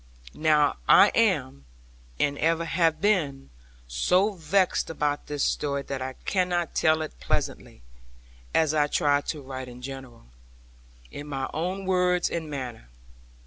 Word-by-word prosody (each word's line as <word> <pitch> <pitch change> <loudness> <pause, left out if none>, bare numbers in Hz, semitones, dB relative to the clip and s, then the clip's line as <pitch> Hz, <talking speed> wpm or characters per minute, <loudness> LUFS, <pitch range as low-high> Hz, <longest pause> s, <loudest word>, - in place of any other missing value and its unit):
Now 150 -2 +2
I - - +8
am, 70 +1 +1 0.5
and 145 -1 +1
ever 165 +1 +1
have 165 -1 +1
been, 155 - 0 0.4
so 180 - +2
vexed 185 +2 +1
about 150 -2 -2
this 145 -1 -2
story 140 -1 -1
that 135 -1 -5
I 130 0 -4
cannot 180 -3 0
tell 155 -1 +2
it 155 - -9
pleasantly - - -3 0.7
(as 155 -2 +2
I 150 -1 +3
try 145 -1 +2
to 145 0 -5
write 130 -1 -7
in 125 0 -11
general) 130 - -9 0.9
in 145 +1 -8
my 135 -2 -3
own 185 +5 -3
words 180 -1 +2
and 160 -2 -3
manner. 125 - -6
150 Hz, 140 wpm, -26 LUFS, 135-170 Hz, 0.9 s, I